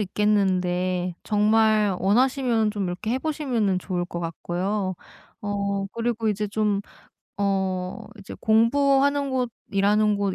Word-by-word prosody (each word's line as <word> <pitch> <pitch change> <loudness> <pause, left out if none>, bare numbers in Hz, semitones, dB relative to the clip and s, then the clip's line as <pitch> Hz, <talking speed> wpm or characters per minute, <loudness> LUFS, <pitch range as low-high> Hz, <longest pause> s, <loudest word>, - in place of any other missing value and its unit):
있겠는데 185 -3 0
정말 215 -1 +3
원하시면 235 +1 +2
좀 205 -2 -3
이렇게 180 +5 -4
해 255 - +1
보시면은 260 - 0
좋을 180 -1 -3
것 175 -1 -6
같고요. 185 +4 -2 0.5
어 200 -1 -2
그리고 230 -1 -1
이제 210 0 -1
좀 210 -1 0 0.6
어 190 -2 -1
이제 195 - -9
공부하는 275 +5 +3
곳 255 -2 0 0.2
일하는 205 +1 +3
곳 200 -2 -1
205 Hz, 255 characters per minute, -24 LUFS, 190-225 Hz, 0.6 s, 정말